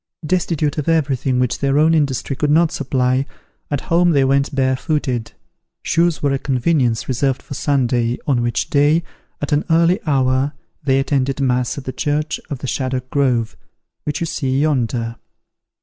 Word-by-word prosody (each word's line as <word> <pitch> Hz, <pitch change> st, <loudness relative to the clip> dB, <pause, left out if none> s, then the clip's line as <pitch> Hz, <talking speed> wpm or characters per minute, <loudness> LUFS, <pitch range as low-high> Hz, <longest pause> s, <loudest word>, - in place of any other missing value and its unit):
Destitute 160 Hz, -3 st, 0 dB
of 150 Hz, -, -2 dB
everything 135 Hz, -5 st, +1 dB
which 125 Hz, -1 st, 0 dB
their 140 Hz, 0 st, +1 dB
own 160 Hz, +2 st, +4 dB
industry 140 Hz, -3 st, 0 dB
could 150 Hz, +2 st, 0 dB
not 160 Hz, +2 st, +4 dB
supply, 130 Hz, 0 st, 0 dB, 0.4 s
at 145 Hz, -2 st, -1 dB
home 175 Hz, +1 st, +2 dB
they 140 Hz, -2 st, +4 dB
went 140 Hz, +1 st, +1 dB
bare 130 Hz, -1 st, +2 dB
footed: 130 Hz, -5 st, -2 dB, 0.5 s
shoes 170 Hz, -2 st, +1 dB
were 140 Hz, -, +2 dB
a 135 Hz, -, -1 dB
convenience 130 Hz, -3 st, 0 dB
reserved 130 Hz, +1 st, 0 dB
for -, -, -8 dB
Sunday, 125 Hz, -4 st, 0 dB
on 130 Hz, -4 st, +1 dB
which 120 Hz, +7 st, -1 dB
day, 150 Hz, +2 st, +3 dB, 0.4 s
at 145 Hz, -, -2 dB
an 150 Hz, +1 st, +2 dB
early 170 Hz, +4 st, +3 dB
hour, 135 Hz, 0 st, +1 dB, 0.3 s
they 135 Hz, -1 st, +2 dB
attended 135 Hz, -1 st, 0 dB
mass 125 Hz, -1 st, 0 dB
at 140 Hz, -, -5 dB
the 130 Hz, -, -5 dB
church 150 Hz, +1 st, -1 dB
of 145 Hz, -, -3 dB
the 135 Hz, -, -6 dB
Shaddock 130 Hz, -1 st, -3 dB
Grove, 125 Hz, -5 st, +1 dB, 0.5 s
which 150 Hz, -, -3 dB
you -, -, +1 dB
see 135 Hz, -4 st, -1 dB
yonder. 120 Hz, -5 st, 0 dB
140 Hz, 165 wpm, -19 LUFS, 130-150 Hz, 0.5 s, own